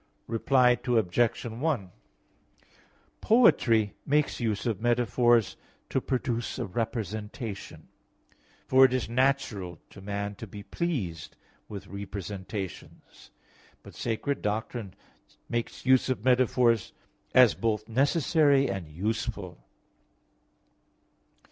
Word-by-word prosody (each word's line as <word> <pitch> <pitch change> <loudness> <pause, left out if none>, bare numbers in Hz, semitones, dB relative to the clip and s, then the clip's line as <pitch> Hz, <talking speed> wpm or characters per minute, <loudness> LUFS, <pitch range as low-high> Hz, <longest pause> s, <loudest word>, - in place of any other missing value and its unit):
Reply 125 +2 +3
Obj. 115 -1 +1
1: 120 - -2 1.3
Poetry 115 - +4
makes 150 +1 +1
use 110 -3 -1
of 110 -5 -1
metaphors 120 -1 +2 0.3
to 135 - +1
produce 120 -3 -2
a - - -2
representation, 110 +1 -5 0.8
for 130 0 +6
it 130 -1 +5
is 130 -2 -1
natural 115 -8 0
to 100 - -12
man 100 +1 -4
to 115 - -8
be 100 +1 -9
pleased 100 - -4 0.3
with 100 -2 -7
representations. 100 -1 -7 0.5
But - - -12
sacred 120 +5 -2
doctrine 105 -1 -3 0.5
makes 120 +1 -4
use 130 0 +4
of 125 -3 -2
metaphors 125 -3 +3 0.4
as 125 -4 +7
both 110 -2 -1
necessary 140 +2 +3
and 95 -4 -5
useful. 90 - -4
115 Hz, 100 wpm, -28 LUFS, 100-130 Hz, 1.3 s, as